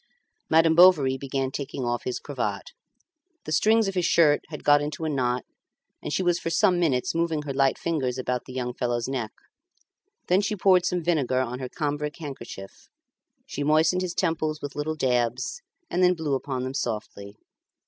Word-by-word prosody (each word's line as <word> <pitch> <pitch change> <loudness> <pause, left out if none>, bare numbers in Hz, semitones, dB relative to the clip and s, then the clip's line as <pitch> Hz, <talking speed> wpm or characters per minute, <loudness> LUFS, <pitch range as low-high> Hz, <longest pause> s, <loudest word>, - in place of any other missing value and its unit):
Madame 160 0 +5
Bovary 160 -6 +6
began 135 0 -3
taking 135 -2 -4
off 120 0 -2
his 125 - -2
cravat. - - -4 0.7
The - - -6
strings 220 +5 +3
of 195 - -2
his 180 -2 0
shirt 150 -3 +4
had 150 -2 -8
got 145 0 +5
into 150 +2 -4
a - - 0
knot, 125 -3 -1 0.6
and - - -5
she 190 - 0
was 175 -1 +2
for - - -3
some 180 +1 +3
minutes 135 -8 +1
moving 165 -2 -1
her 140 -2 -4
light 135 0 +2
fingers 135 -7 -2
about 125 -1 -2
the - - -10
young 125 -1 -3
fellow's 120 -2 -2
neck. 125 -5 -3 1.0
Then 185 +2 +3
she 210 +1 -1
poured 185 -2 +4
some 180 -1 -1
vinegar 140 -7 +1
on 125 0 -4
her 130 -1 -5
cambric 150 0 -3
handkerchief; 130 - -9 0.6
she 145 - -4
moistened 155 +4 +3
his 180 -2 -3
temples 155 -3 -1
with 145 - -7
little 155 +2 -2
dabs, 125 - -1 0.3
and 180 - -1
then 180 0 +4
blew 160 -4 -2
upon 130 -1 -2
them 130 +1 -4
softly. 105 -5 -4
145 Hz, 180 wpm, -25 LUFS, 130-165 Hz, 1.0 s, Bovary